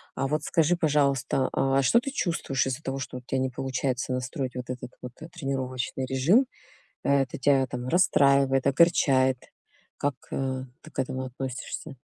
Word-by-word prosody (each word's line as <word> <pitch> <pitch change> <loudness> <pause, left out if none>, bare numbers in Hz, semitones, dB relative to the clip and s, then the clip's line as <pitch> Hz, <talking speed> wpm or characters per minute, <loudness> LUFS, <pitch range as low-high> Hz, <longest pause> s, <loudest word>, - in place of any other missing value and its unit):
А 135 - -1
вот 150 +1 -1
скажи, 170 0 +2
пожалуйста, 140 -4 +1
а 135 0 +2
что 230 - +4
ты 275 +2 -5
чувствуешь 165 - 0
из-за 130 +3 -3
того, 135 +1 -3
что 125 - -5
вот 125 - -10
у - - -56
тя 135 - -1
не 130 0 0
получается 130 0 -2
настроить 130 0 -3
вот 125 -1 -6
этот 125 -1 -6
вот, 125 -1 -7
э, 160 - -7
тренировочный 130 -5 -3
режим: 150 - +3 0.6
э, 140 -1 +3
это 130 - -7
тя 135 0 +3
там 125 +1 -5
расстраивает, 140 -5 +4
огорчает? 135 -4 +4 0.6
Как, 140 -2 -1 0.2
э, 130 -1 -2 0.2
ты 155 - -14
к - - -7
этому 130 0 -2
относишься? 130 +3 -6
135 Hz, 175 wpm, -27 LUFS, 130-145 Hz, 0.6 s, что